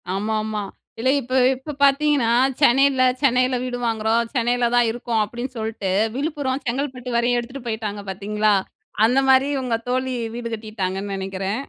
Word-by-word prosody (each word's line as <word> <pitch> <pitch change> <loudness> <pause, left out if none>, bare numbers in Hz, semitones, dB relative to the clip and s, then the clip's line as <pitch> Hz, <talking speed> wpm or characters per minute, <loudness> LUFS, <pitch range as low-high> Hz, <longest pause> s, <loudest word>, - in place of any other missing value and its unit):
ஆமாமா. 215 +1 -2 0.4
இதுல 255 +3 +1
இப்ப 255 0 -7 0.2
இப்ப 275 +3 -8
பாத்தீங்கன்னா, 280 -3 +3 0.3
சென்னையில 270 0 +4 0.2
சென்னையில 255 -2 +3
வீடு 250 -1 -3
வாங்குறோம். 225 +1 0
சென்னையில 240 0 +1
தான் 240 -1 +4
இருக்கோம். 235 -1 -1
அப்படின்னு 240 +4 -6
சொல்ட்டு, 220 -3 -3 0.2
விழுப்புரம் 285 -2 -2
செங்கல்பட்டு 250 -1 -3
வரையும் 240 +1 +2
எடுத்துட்டு 250 +2 -8
போயிட்டாங்க 215 -2 -4
பாத்தீங்களா? 210 +2 0 0.5
அந்த 250 +4 +3
மாரி, 265 +1 +5
உங்க 250 -3 -1
தோழி 255 0 -1 0.2
வீடு 240 0 -4
கட்டிட்டாங்கன்னு 200 -3 -4
நெனைக்கிறேன். 195 +4 -3
240 Hz, 140 wpm, -22 LUFS, 215-260 Hz, 0.5 s, மாரி